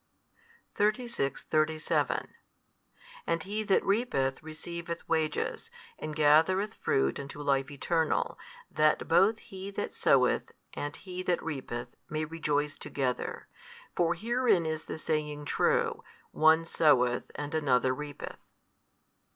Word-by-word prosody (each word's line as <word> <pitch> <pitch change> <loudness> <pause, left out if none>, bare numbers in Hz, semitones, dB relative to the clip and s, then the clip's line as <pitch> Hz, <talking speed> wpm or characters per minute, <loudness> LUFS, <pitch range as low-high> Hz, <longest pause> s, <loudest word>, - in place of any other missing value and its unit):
36, 210 - 0
37 155 0 0 0.9
And 165 -1 0
he 210 +3 -2
that 205 -3 +2
reapeth 195 - +1
receiveth 170 +2 -6
wages, 160 -2 -1 0.3
and 155 -1 -5
gathereth 165 +8 +4
fruit 65 - 0
unto 140 +1 -7
life 135 -2 +1
eternal, 160 +3 0 0.4
that 155 0 +2
both 200 +6 +4
he 190 -2 -8
that 200 - -4
soweth - - +3 0.2
and 145 0 -4
he 185 -1 -7
that 180 -1 0
reapeth 125 -6 -5
may 155 0 -1
rejoice 150 -2 -1
together. 130 -3 -3 0.5
For 170 -1 +2
herein 230 -3 +2
is 155 0 -3
the - - -5
saying 150 -2 -2
true, - - +1 0.3
One 160 +1 +4
soweth 125 -7 +3
and 145 +1 -5
another 130 -4 +2
reapeth. 145 +2 -7
155 Hz, 115 wpm, -30 LUFS, 145-175 Hz, 0.9 s, gathereth